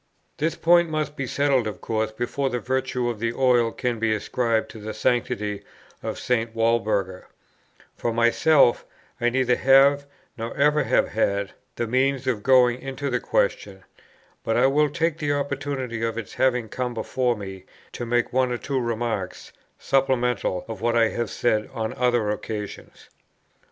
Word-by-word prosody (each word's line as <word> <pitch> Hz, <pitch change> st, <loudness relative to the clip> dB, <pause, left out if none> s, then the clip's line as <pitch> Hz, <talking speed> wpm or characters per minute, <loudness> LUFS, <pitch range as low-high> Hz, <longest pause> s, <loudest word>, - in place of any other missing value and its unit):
This 160 Hz, +2 st, 0 dB
point 170 Hz, 0 st, +4 dB
must 155 Hz, -1 st, -2 dB
be 135 Hz, -3 st, -4 dB
settled 135 Hz, -4 st, +1 dB
of 105 Hz, -, -6 dB
course 110 Hz, -1 st, -2 dB
before 120 Hz, +5 st, -2 dB
the 125 Hz, -, -2 dB
virtue 130 Hz, -1 st, -1 dB
of 120 Hz, -3 st, -3 dB
the 115 Hz, +1 st, -1 dB
oil 120 Hz, -3 st, +3 dB
can 120 Hz, -1 st, -2 dB
be 110 Hz, -1 st, +1 dB
ascribed 115 Hz, +1 st, 0 dB
to 110 Hz, -, -10 dB
the 110 Hz, +1 st, -6 dB
sanctity 110 Hz, -3 st, -1 dB, 0.4 s
of -, -, -4 dB
St. 115 Hz, -2 st, -1 dB
Walburga; 110 Hz, -5 st, 0 dB, 0.7 s
for 120 Hz, -, -1 dB
myself, 120 Hz, +3 st, +4 dB, 0.4 s
I 120 Hz, -, +3 dB
neither 125 Hz, 0 st, +2 dB
have, 140 Hz, +2 st, +4 dB, 0.3 s
nor 115 Hz, +1 st, -5 dB
ever 150 Hz, +1 st, +3 dB
have -, -, +2 dB
had, 100 Hz, 0 st, 0 dB, 0.2 s
the 120 Hz, -, -2 dB
means 130 Hz, +3 st, +1 dB
of 120 Hz, -5 st, -1 dB
going 125 Hz, 0 st, +4 dB
into 135 Hz, +1 st, -4 dB
the 125 Hz, -, +1 dB
question; 95 Hz, -5 st, -1 dB, 0.6 s
but 115 Hz, -, 0 dB
I -, -, +4 dB
will 145 Hz, +2 st, +3 dB
take 165 Hz, +1 st, -1 dB
the 145 Hz, -2 st, 0 dB
opportunity 140 Hz, -4 st, -3 dB
of 115 Hz, 0 st, -2 dB
its 115 Hz, -4 st, -6 dB
having 125 Hz, -3 st, +1 dB
come 125 Hz, +1 st, -4 dB
before 120 Hz, +2 st, 0 dB
me, 95 Hz, -3 st, -8 dB, 0.3 s
to -, -, -6 dB
make 120 Hz, 0 st, 0 dB
one 130 Hz, -1 st, +2 dB
or 120 Hz, -, -1 dB
two 135 Hz, +2 st, -2 dB
remarks, 115 Hz, -5 st, -3 dB, 0.2 s
supplemental 125 Hz, -8 st, 0 dB
of 110 Hz, -3 st, -7 dB
what 120 Hz, 0 st, +1 dB
I 115 Hz, -1 st, +4 dB
have 120 Hz, -2 st, -3 dB
said 110 Hz, -3 st, 0 dB
on 110 Hz, -1 st, -2 dB
other 120 Hz, -4 st, +1 dB
occasions. 105 Hz, -1 st, -7 dB
120 Hz, 165 wpm, -24 LUFS, 115-135 Hz, 0.7 s, point